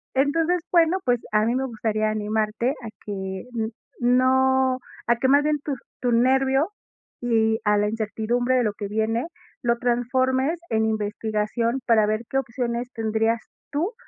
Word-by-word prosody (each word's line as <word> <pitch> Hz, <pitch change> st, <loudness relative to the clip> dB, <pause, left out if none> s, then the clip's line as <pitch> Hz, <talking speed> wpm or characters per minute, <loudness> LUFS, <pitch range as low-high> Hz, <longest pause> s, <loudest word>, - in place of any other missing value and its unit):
Entonces, 325 Hz, +6 st, +2 dB
bueno, 340 Hz, +1 st, +4 dB
pues, 245 Hz, -2 st, +2 dB
a 215 Hz, 0 st, +3 dB
mí 235 Hz, -, +1 dB
me 265 Hz, +1 st, 0 dB
gustaría 215 Hz, -3 st, -1 dB
animarte 215 Hz, +2 st, 0 dB
a 255 Hz, -6 st, -8 dB, 0.2 s
que 190 Hz, -2 st, -4 dB
n 220 Hz, -1 st, -1 dB, 0.3 s
no 260 Hz, +1 st, +3 dB, 0.3 s
a 235 Hz, -, +4 dB
que 260 Hz, -, +1 dB
más 285 Hz, +2 st, +5 dB
bien 300 Hz, 0 st, +1 dB
tus 280 Hz, -3 st, -3 dB, 0.2 s
tu 245 Hz, -1 st, +1 dB
nervio, 265 Hz, +5 st, +3 dB, 0.5 s
y 225 Hz, -2 st, +2 dB
a 210 Hz, 0 st, +4 dB
la 210 Hz, 0 st, +2 dB
incertidumbre 225 Hz, +3 st, 0 dB
de 250 Hz, -, +3 dB
lo 210 Hz, -2 st, 0 dB
que 205 Hz, -1 st, -5 dB
viene, 220 Hz, +5 st, -1 dB, 0.4 s
lo 235 Hz, -1 st, +2 dB
transformes 260 Hz, +5 st, +1 dB
en 220 Hz, 0 st, +2 dB
investigación 220 Hz, +3 st, -1 dB
para 220 Hz, -2 st, +5 dB
ver 215 Hz, +1 st, 0 dB
qué 270 Hz, -, 0 dB
opciones 245 Hz, -1 st, -3 dB
tendrías 225 Hz, 0 st, 0 dB, 0.3 s
tú 335 Hz, +10 st, -1 dB
235 Hz, 160 wpm, -24 LUFS, 220-260 Hz, 0.5 s, más